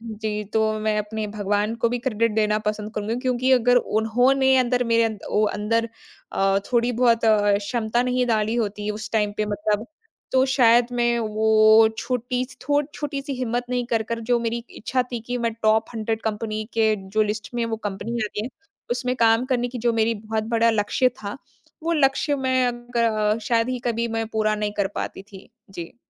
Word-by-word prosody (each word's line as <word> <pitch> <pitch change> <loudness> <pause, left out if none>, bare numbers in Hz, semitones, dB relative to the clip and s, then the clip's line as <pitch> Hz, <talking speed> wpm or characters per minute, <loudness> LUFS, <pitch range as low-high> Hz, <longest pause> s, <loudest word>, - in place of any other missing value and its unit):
जी, 215 -2 -4
तो 220 +1 0
मैं 215 0 0
अपने 215 +1 -3
भगवान 205 +1 -1
को - - +5
भी 245 +1 -2
क्रेडिट 230 -2 0
देना 215 -1 +2
पसंद 210 0 -2
करूँगी। 215 +2 -2
क्योंकि 255 0 +1
अगर 245 -1 +4
उन्होंने 250 +4 +3
अंदर 250 0 +1
मेरे 230 -1 +3 0.2
ओ 210 - +2
अंदर 230 +2 0 0.4
अ, 195 0 +2
थोड़ी 240 0 +3
बहुत 235 -2 +4
क्षमता 215 +2 +2
नहीं 250 0 0
डाली 220 -1 +1
होती 210 -2 -2
उस 215 +1 -6
टाइम 210 -2 +1
पे 215 - -1
मतलब 210 +2 -1 0.5
तो 260 0 +4
शायद 240 -2 +5
मैं 240 -1 +1
वो 220 0 +5
छोटी 250 0 -2 0.2
थो 290 +2 +2
छोटी-सी 280 -1 -4
हिम्मत 245 -1 -2
नहीं 245 -1 0
कर 225 -1 +2
कर 230 +1 -4
जो 240 - +4
मेरी 235 0 -1 0.2
इच्छा 255 +4 0
थी 235 - -3
कि 245 0 -2
मैं 230 -1 -1
टॉप 220 +1 +3
100 220 0 -2
कंपनी 215 0 -3
के 220 -1 +3 0.2
जो 215 - +4
लिस्ट 210 0 -3
में 235 - 0
वो 225 -1 -2
कंपनी 205 +3 -4
आ - - -1
गई 210 - -1
है, - - -4 0.4
उसमें 250 +1 -1
काम 230 +1 +3
करने 245 -2 0
की 250 - -6
जो 235 - +4
मेरी 225 0 +1
बहुत 215 0 -3
बड़ा 230 0 +4
लक्ष्य 220 +4 +2
था, 200 +4 -5 0.5
वो 335 +1 0
लक्ष्य 285 0 +2
मैं 260 -1 +1
अ, - - +1 0.3
ग 215 -2 +2
शायद 230 +2 +1
ही 255 - -2
कभी 235 0 0
मैं 225 0 -2
पूरा 215 -1 0
नहीं 210 -1 -2
कर 200 - +2
पाती - - -4
थी। 195 -1 -14 0.2
जी। 170 +2 -8
225 Hz, 190 wpm, -23 LUFS, 215-245 Hz, 0.5 s, को